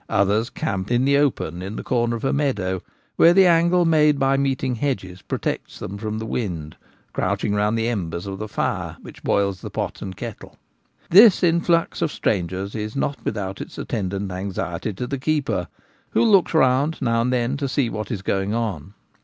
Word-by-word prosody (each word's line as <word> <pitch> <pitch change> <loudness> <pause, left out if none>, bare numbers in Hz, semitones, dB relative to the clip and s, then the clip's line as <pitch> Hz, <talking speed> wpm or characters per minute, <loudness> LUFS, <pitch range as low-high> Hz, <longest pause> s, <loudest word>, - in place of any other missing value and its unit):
Others 105 +4 +2
camp 95 -3 -3
in 120 +2 +2
the 140 +1 +4
open 90 - 0
in 95 +3 -5
the - - -5
corner 120 -1 0
of 115 - -5
a - - +1
meadow, 105 -11 0 0.4
where 170 - +7
the 190 -1 +7
angle 170 +1 +4
made 150 -3 +4
by 135 0 +2
meeting 135 -2 0
hedges 110 -8 -3
protects - - -4
them 100 +2 -6
from 110 0 -3
the 110 - -4
wind, 85 -11 -4 0.4
crouch - - -1
ing 100 - 0
round 105 +2 +1
the 115 0 0
embers 90 -7 -3
of 95 -1 -5
the 110 - -4
fire - - -2
which - - -12
boils 100 -3 +1
the - - -6
pot - - -4
and 95 -2 -6
kettle. - - -8 0.5
This 200 +2 +8
influx 170 0 +2
of 160 - +1
strangers 95 - -2
is 105 0 -4
not 140 0 -2
without 100 -2 -3
its - - -9
attendant 100 -1 -3
anxiety 95 0 -3
to 125 - -4
the 140 +2 -4
keeper, 150 0 0 0.4
who - - +2
looks 195 -6 +4
round 140 +2 +3
now 115 -3 +1
and 125 +2 0
then 125 +1 0
to 140 -1 -2
see 130 -1 +1
what 110 -1 -5
is 105 -6 -4
going 100 +2 0
on. 100 -5 -3
115 Hz, 195 wpm, -22 LUFS, 100-140 Hz, 0.5 s, This